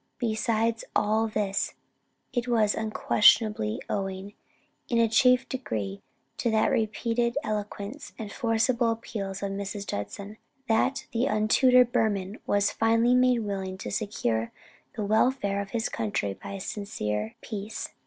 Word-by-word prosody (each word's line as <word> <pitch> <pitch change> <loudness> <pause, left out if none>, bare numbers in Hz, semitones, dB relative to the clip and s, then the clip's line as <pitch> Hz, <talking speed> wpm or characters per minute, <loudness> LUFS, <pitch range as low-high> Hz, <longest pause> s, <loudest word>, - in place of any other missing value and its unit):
"Besides 230 -1 0
all 220 +2 +2
this, 205 -2 -1 0.6
it 245 -1 -1
was 220 -4 +3
unquestionably 215 - +3
owing, 195 0 -3 0.6
in 235 - +1
a 230 0 +5
chief 250 +3 +4
degree, 105 - -4 0.4
to 235 - 0
the 220 -1 +3
repeated 235 +3 0
eloquence 210 +3 -4
and 215 -3 -6
forcible 230 0 +1
appeals 205 -4 -4
of 200 - -2
Mrs. 200 +1 -4
Judson, 200 - -5 0.3
that 230 +4 +1
the 240 +3 +1
untutored 245 +3 +4
Burman 200 -3 0
was 205 0 +2
finally 230 +2 +3
made 250 -1 +4
willing 190 -3 -4
to - - -6
secure 120 - -1 0.4
the 215 -3 -2
welfare 215 -2 +2
of 200 - -7
his 225 +1 -1
country 100 -2 -2
by 95 - -9
a 195 - -5
sincere 110 - -3
peace." 210 -1 -5
215 Hz, 135 wpm, -27 LUFS, 200-230 Hz, 0.6 s, a